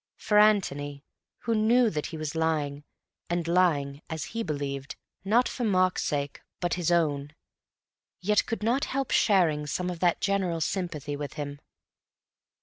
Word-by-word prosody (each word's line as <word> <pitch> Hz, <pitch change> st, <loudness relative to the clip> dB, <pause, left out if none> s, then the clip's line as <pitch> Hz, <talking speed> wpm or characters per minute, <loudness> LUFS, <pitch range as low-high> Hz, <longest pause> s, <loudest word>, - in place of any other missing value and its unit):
For 210 Hz, -1 st, +3 dB
Antony, 145 Hz, -10 st, +2 dB, 0.4 s
who 230 Hz, -, 0 dB
knew 225 Hz, +2 st, +4 dB
that 150 Hz, -2 st, -2 dB
he 160 Hz, -, -7 dB
was 155 Hz, -2 st, -4 dB
lying, 150 Hz, -3 st, -1 dB, 0.4 s
and 175 Hz, -1 st, -1 dB
lying 155 Hz, -5 st, +2 dB
(as 160 Hz, -3 st, -3 dB
he 230 Hz, -, -1 dB
believed) 140 Hz, -6 st, -4 dB, 0.3 s
not 225 Hz, +6 st, +3 dB
for 250 Hz, -, -4 dB
Mark's 185 Hz, -4 st, +2 dB
sake 145 Hz, -1 st, -2 dB, 0.2 s
but 175 Hz, -1 st, -1 dB
his 175 Hz, -1 st, 0 dB
own, 150 Hz, -3 st, +1 dB, 0.8 s
yet 210 Hz, +3 st, +2 dB
could 225 Hz, -2 st, -3 dB
not 250 Hz, +6 st, +2 dB
help 270 Hz, -1 st, -2 dB
sharing 165 Hz, -8 st, +3 dB
some 180 Hz, +5 st, -2 dB
of 175 Hz, -, -7 dB
that 175 Hz, -1 st, +2 dB
general 190 Hz, -4 st, 0 dB
sympathy 160 Hz, -4 st, -2 dB
with 145 Hz, 0 st, -5 dB
him. 145 Hz, -1 st, -5 dB
170 Hz, 150 wpm, -28 LUFS, 145-200 Hz, 0.8 s, knew